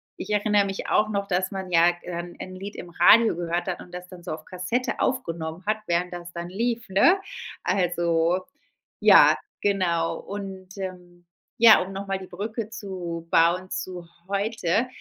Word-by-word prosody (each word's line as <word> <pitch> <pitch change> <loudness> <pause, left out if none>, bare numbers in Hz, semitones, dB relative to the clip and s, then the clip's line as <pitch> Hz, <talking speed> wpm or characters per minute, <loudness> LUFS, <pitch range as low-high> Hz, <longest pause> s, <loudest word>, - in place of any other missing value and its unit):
ich 190 - -8
erinnere 210 -1 +3
mich 195 0 -4
auch 215 0 +3
noch, 200 -1 -2
dass 185 0 0
man 190 -2 -6
ja 170 +1 +5
en 175 0 -6
'n 185 0 -7
Lied 200 +2 -7
im 175 - -9
Radio 225 +3 +6
gehört 175 +1 -2
hat 180 - -3
und 180 - -13
das 180 0 -7
dann 180 -2 -11
so 180 - -5
auf 155 0 -6
Kassette 185 +8 -2
aufgenommen 165 -7 -2
hat, 215 +1 +1
während 175 +1 0
das 175 0 -7
dann 170 0 -5
lief, 230 +4 -2
ne? 335 - +5 0.4
Also 175 -1 +1 0.6
ja, - - +8 0.3
genau. 175 -5 +1
Und, 195 -2 -8
ähm, 180 -2 -8 0.3
ja, 230 -1 +8
um 190 - -9
noch 195 +1 -6
mal 195 0 -1
die 190 - -9
Brücke 215 +4 -5
zu 180 -7 -6
bauen 175 +3 +3
zu 180 -2 -5 0.2
heute: 205 +2 0
185 Hz, 170 wpm, -25 LUFS, 175-200 Hz, 0.6 s, ja